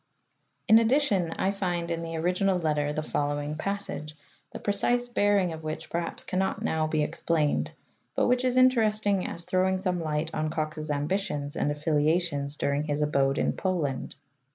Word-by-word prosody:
In 220 Hz, 0 st, +8 dB
addition 225 Hz, -, +2 dB
I 195 Hz, -, 0 dB
find 175 Hz, -4 st, -2 dB
in 165 Hz, 0 st, -2 dB
the 165 Hz, 0 st, -5 dB
original 180 Hz, +3 st, +1 dB
letter 150 Hz, -3 st, 0 dB
the 155 Hz, +1 st, -2 dB
following 145 Hz, 0 st, -2 dB
passage, 155 Hz, -4 st, -4 dB, 0.3 s
the -, -, -7 dB
precise 240 Hz, +4 st, +1 dB
bearing 205 Hz, -6 st, +2 dB
of 160 Hz, -, -7 dB
which 155 Hz, 0 st, -6 dB
perliaps 170 Hz, 0 st, -3 dB
cannot 190 Hz, 0 st, -1 dB
now 155 Hz, -1 st, 0 dB
be 155 Hz, -1 st, +1 dB
explained, 155 Hz, -1 st, 0 dB, 0.5 s
but -, -, +2 dB
which 250 Hz, +1 st, +2 dB
is 255 Hz, 0 st, +1 dB
interesting 215 Hz, -6 st, +3 dB
as 170 Hz, -, -5 dB
throwing 185 Hz, 0 st, +2 dB
some 180 Hz, -2 st, -1 dB
light 155 Hz, 0 st, -2 dB
on 155 Hz, 0 st, -1 dB
Cox's 155 Hz, 0 st, -3 dB
ambitions 145 Hz, -1 st, -2 dB
and -, -, 0 dB
affiliations 150 Hz, 0 st, 0 dB
during 140 Hz, 0 st, 0 dB
his 150 Hz, -1 st, -1 dB
abode 140 Hz, -1 st, +2 dB
in -, -, +1 dB
Poland. 160 Hz, -9 st, -2 dB
165 Hz, 160 wpm, -27 LUFS, 150-195 Hz, 0.5 s, In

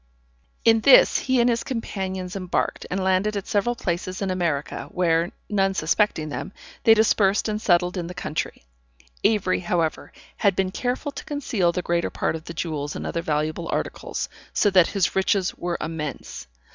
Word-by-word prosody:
In 225 Hz, -1 st, +6 dB
this 255 Hz, +4 st, +7 dB
he 260 Hz, -1 st, +1 dB
and 235 Hz, -, +4 dB
his 235 Hz, -1 st, +1 dB
companions 190 Hz, -6 st, -4 dB
embarked, 185 Hz, -2 st, -2 dB
and 190 Hz, +1 st, -1 dB
landed 190 Hz, +3 st, +1 dB
at 200 Hz, -, -4 dB
several 225 Hz, +4 st, 0 dB
places 185 Hz, -4 st, -3 dB
in 195 Hz, -2 st, -1 dB
America, 170 Hz, -6 st, -2 dB
where, 170 Hz, -1 st, +1 dB, 0.2 s
none 195 Hz, -2 st, +1 dB
suspecting 160 Hz, -2 st, +1 dB
them, 170 Hz, -, -5 dB, 0.3 s
they 225 Hz, -, +8 dB
dispersed 210 Hz, -2 st, +3 dB
and 215 Hz, 0 st, -2 dB
settled 180 Hz, -1 st, +2 dB
in 175 Hz, -2 st, -3 dB
the 180 Hz, -, -8 dB
country. 160 Hz, -, -4 dB, 0.6 s
Avery, 210 Hz, -4 st, +2 dB
however, 170 Hz, -3 st, -1 dB, 0.3 s
had 200 Hz, -3 st, +2 dB
been 190 Hz, 0 st, 0 dB
careful 250 Hz, +7 st, -2 dB
to -, -, -8 dB
conceal 235 Hz, -, 0 dB
the 180 Hz, +1 st, -3 dB
greater 170 Hz, 0 st, 0 dB
part -, -, -1 dB
of 160 Hz, 0 st, -8 dB
the 170 Hz, -, -7 dB
jewels 150 Hz, -3 st, -3 dB
and -, -, -5 dB
other 170 Hz, -, -2 dB
valuable 155 Hz, +1 st, -2 dB
articles, -, -, -3 dB, 0.3 s
so 205 Hz, -, +3 dB
that 185 Hz, -3 st, +6 dB
his 195 Hz, -3 st, 0 dB
riches 190 Hz, 0 st, +1 dB
were 175 Hz, -1 st, -3 dB
immense. 150 Hz, -, -5 dB
185 Hz, 170 wpm, -24 LUFS, 170-210 Hz, 0.6 s, they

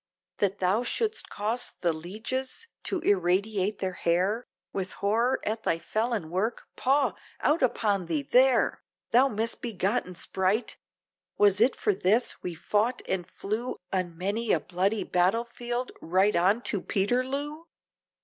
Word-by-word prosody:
That 200 Hz, -1 st, +1 dB
thou 190 Hz, +4 st, +2 dB
should'st 440 Hz, -, -1 dB
cause 220 Hz, +4 st, -2 dB
the 170 Hz, -2 st, +2 dB
lieges 220 Hz, -, -4 dB, 0.2 s
to 375 Hz, -4 st, 0 dB
irradiate 200 Hz, -, +1 dB
their 190 Hz, -1 st, -2 dB
hair, 185 Hz, +8 st, 0 dB, 0.3 s
With 185 Hz, -1 st, -3 dB
horror 230 Hz, +6 st, +1 dB
at 220 Hz, +1 st, -1 dB
thy 165 Hz, -, +1 dB
felon 215 Hz, -1 st, -2 dB
work? 205 Hz, +7 st, -1 dB
paugh! 275 Hz, +2 st, +2 dB, 0.3 s
out 305 Hz, +3 st, +2 dB
upon 205 Hz, -7 st, +1 dB
thee! 155 Hz, -4 st, 0 dB
there! 255 Hz, -, +3 dB, 0.3 s
Thou 250 Hz, +4 st, +6 dB
misbegotten 220 Hz, -3 st, -1 dB
sprite! 190 Hz, +6 st, -1 dB, 0.6 s
was 205 Hz, 0 st, +4 dB
it 245 Hz, +3 st, +4 dB
for 210 Hz, -, +1 dB
this! 205 Hz, +6 st, +1 dB
we 175 Hz, -2 st, -4 dB
fought 215 Hz, +9 st, 0 dB
and 180 Hz, -2 st, -1 dB
flew, 215 Hz, +6 st, -3 dB, 0.2 s
On 180 Hz, -3 st, -1 dB
many 205 Hz, +5 st, -1 dB
a -, -, +4 dB
bloody 190 Hz, +4 st, 0 dB
battle 185 Hz, +7 st, +2 dB
field, 240 Hz, +1 st, -3 dB
right 190 Hz, +4 st, +2 dB
on 195 Hz, +7 st, +3 dB
to 200 Hz, -, +1 dB
Peterloo? 260 Hz, +9 st, -1 dB
210 Hz, 140 wpm, -28 LUFS, 185-240 Hz, 0.6 s, Thou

